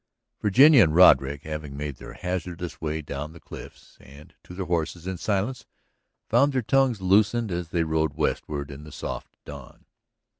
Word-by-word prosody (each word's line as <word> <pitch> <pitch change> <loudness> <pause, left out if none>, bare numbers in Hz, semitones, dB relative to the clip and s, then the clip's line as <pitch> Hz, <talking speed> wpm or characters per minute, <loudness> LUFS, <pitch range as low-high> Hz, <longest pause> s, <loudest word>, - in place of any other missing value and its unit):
Virginia 130 +7 +6
and 80 -5 +3
Roderick, 70 -6 +5
having 75 -2 -6
made 75 -2 -5
their - - -11
hazardous 90 -1 -5
way 80 0 -3
down 75 +1 -6
the 85 - -13
cliffs - - -13
and 70 +3 -16
to 90 - -12
their 95 0 -4
horses 85 0 -2
in 95 0 -3
silence, 105 +7 -2 0.6
found 140 0 +3
their 130 -2 0
tongues 130 -3 +2
loosened 105 +3 +2
as 85 -1 -4
they 85 -1 0
rode 80 0 0
westward 70 -1 -2
in 70 +1 -10
the 75 - -12
soft - - -7
dawn. - - -12
85 Hz, 165 wpm, -25 LUFS, 75-100 Hz, 0.6 s, Virginia